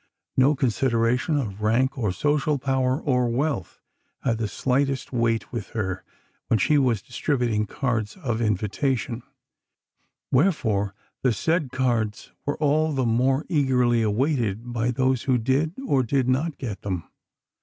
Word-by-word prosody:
No 135 +3 +4
consideration 125 +2 +1
of 105 -7 -3
rank 120 +5 +2
or 110 -7 0
social 150 +7 +1
power 130 0 0
or 125 -6 +1
wealth 125 - -2 0.4
had 115 -3 0
the 110 - 0
slightest 135 +4 -1
weight 115 -2 0
with 115 -4 -4
her 95 -3 -2 0.4
when 115 - +3
she 145 +9 +3
was 120 -7 +1
distributing 120 -7 -1
cards 115 - -2
of 120 -9 -2
invitation, 115 +3 -1 1.1
wherefore 115 - +1 0.3
the 130 - +3
said 155 - 0
cards 115 -5 -1 0.2
were 145 - 0
all 155 +1 +2
the 130 -2 0
more 130 +5 +2
eagerly 125 -7 +2
awaited 115 0 0
by 120 0 0
those 130 0 +1
who 125 - +4
did, 135 +8 0
and 140 - 0
did 130 0 +1
not, 140 +4 0
get 110 -7 -5
them. 90 -4 -3
125 Hz, 140 wpm, -25 LUFS, 115-140 Hz, 1.1 s, No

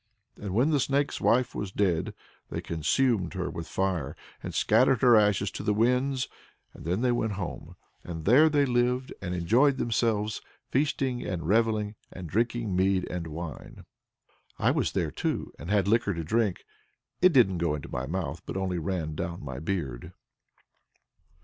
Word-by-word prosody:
And 100 -2 -5
when 130 +8 +3
the 145 - +3
Snake's 140 +2 0
Wife 125 +1 +2
was 100 -2 -4
dead 95 -5 0 0.3
they - - -3
consumed 95 - 0
her 90 -1 -2
with 85 -1 -6
fire, 90 -7 -1 0.3
and - - -5
scattered 130 -4 +3
her 120 -2 +7
ashes 105 -2 +3
to - - -6
the 105 0 0
winds. 125 +4 +1 0.5
And - - -12
then 90 +6 0
they 125 -1 +2
went 110 -3 0
home, 95 -3 -6 0.3
and 80 -2 -7
there 140 +9 +6
they 145 -2 +3
lived 125 0 0
and 90 -2 -3
enjoyed 120 +11 +3
themselves, 110 -3 0 0.3
feasting 135 -2 0
and 85 -4 -4
revelling, 110 0 +2 0.2
and 90 -2 -8
drinking 115 +1 -1
mead 95 0 +2
and 90 -2 -4
wine. 80 0 -8 0.7
I - - +3
was - - 0
there, - - -1
too, - - -3
and 85 - -8
had 100 -2 +2
liquor 100 -3 +2
to 85 - -3
drink; 105 +3 0 0.6
it 185 - +7
didn't 110 - +4
go 85 -3 +1
into 75 - -7
my 65 +2 -4
mouth, 85 0 -3
but - - -4
only 95 -2 -1
ran 80 -2 -2
down 85 0 -5
my 65 -1 -5
beard. 80 -8 -4
100 Hz, 170 wpm, -28 LUFS, 85-120 Hz, 0.7 s, her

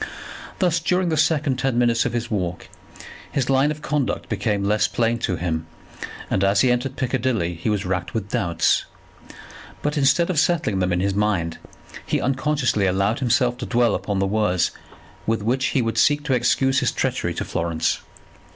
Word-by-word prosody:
Thus 175 -3 +2
during 180 +2 +1
the 160 - +1
second 150 -3 +1
ten 130 -2 0
minutes 120 -1 +2
of - - -5
his 120 0 -3
walk, 90 -4 -3 0.6
his 135 -1 0
line 135 +2 +3
of 150 0 -5
conduct 150 -3 -1
became 105 -3 -1
less 105 +1 +2
plain 115 0 0
to 95 - -1
him, 80 -2 -3 0.6
and 95 - 0
as 100 0 +3
he 125 - +4
entered 125 +2 -1
Piccadilly 125 -9 -1
he 85 +6 -3
was 105 -3 -1
racked 90 +1 -3
with 105 -3 -2
doubts. 85 -1 +1 1.0
But 150 +1 0
instead 145 +6 +3
of 160 - +1
settling 155 - +1
them 90 -1 0
in 90 +1 +1
his 100 +1 0
mind 95 -5 0 0.4
he - - -1
unconsciously 135 -6 +1
allowed 100 +4 +1
himself 125 -1 +1
to - - -4
dwell 120 -3 +2
upon 100 -2 -2
the 95 - +1
words 95 -3 +1 0.6
with 110 -1 0
which 130 +4 +1
he 130 - +1
would 115 0 -1
seek 145 0 +3
to 140 - 0
excuse 130 +2 +2
his - - +1
treachery - - -1
to - - -3
Florence. 85 -1 -1
115 Hz, 180 wpm, -22 LUFS, 100-135 Hz, 1.0 s, he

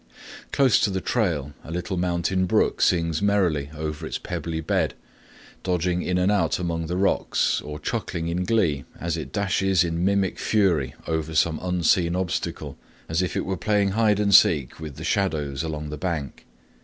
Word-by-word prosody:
Close 135 -4 +4
to - - +2
the 95 -1 -1
trail 85 - -1
a - - -11
little 90 +3 -3
mountain 90 +1 0
brook - - +2
sings 85 -2 +2
merrily 90 -9 +1
over 75 -1 -4
its - - -3
pebbly 80 -1 -4
bed, 80 - 0 0.7
dodging 90 -1 0
in 90 0 -1
and 90 +2 +2
out 95 -6 +2
among 85 -2 -2
the 90 +2 -2
rocks, 95 +1 +1
or 75 0 -7
chuckling 80 +2 -3
in 85 +2 -1
glee 90 -9 +1 0.2
as 85 0 -2
it 80 - -6
dashes 95 -3 +2
in 85 0 -2
mimic 100 -1 +1
fury 85 -10 +1
over 80 -1 -2
some 80 0 +2
unseen 90 -1 +2
obstacle, 85 -5 -3 0.3
as 80 +2 0
if 90 - -2
it - - -1
were 95 - -1
playing 100 +2 +1
hide 105 0 +2
and 100 -1 +2
seek 75 -8 +5
with 75 -4 -7
the 75 - -8
shadows 80 -8 -1
along 75 -2 -4
the 75 - -5
bank. 80 -5 -4
85 Hz, 175 wpm, -24 LUFS, 80-95 Hz, 0.7 s, seek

